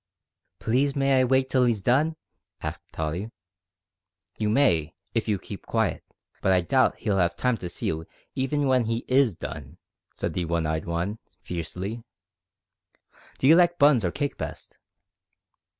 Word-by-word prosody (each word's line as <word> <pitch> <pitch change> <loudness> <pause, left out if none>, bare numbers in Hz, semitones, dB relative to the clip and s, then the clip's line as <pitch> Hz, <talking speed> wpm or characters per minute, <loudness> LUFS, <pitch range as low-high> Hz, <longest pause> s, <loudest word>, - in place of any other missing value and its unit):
"Please 135 +5 +1
may 135 -1 +3
I - - +3
wait 130 +1 +2
till 130 -1 +3
he's 115 -5 0
done?" 150 +8 +2 0.5
asked - - -4
Tottie. 80 +7 -3 1.1
"You 105 -1 +1
may, 85 - +2 0.2
if 115 -1 -1
you 105 -2 +1
keep 100 +1 -10
quiet, 110 -4 0 0.4
but 95 - +2
I 90 -1 +4
doubt 130 +9 +3
if - - -27
he'll 100 -3 +1
'ave 85 -1 +2
time 125 -1 +1
to 90 -3 -6
see - - -6
you 80 0 -2 0.3
even 135 +3 -1
w'en 130 -4 +3
he 115 +1 -2
is 130 -6 +3
done," 75 +3 -7 0.4
said - - -3
the 90 - -1
one 85 -1 0
eyed 80 0 -1
one, 85 +6 -2 0.2
fiercely. 90 +6 -5 1.4
"D'you 145 +5 +6
like 175 0 +4
buns 140 -6 +5
or 90 - +1
cake 140 - -3
best?" - - -7
110 Hz, 160 wpm, -26 LUFS, 90-130 Hz, 1.4 s, D'you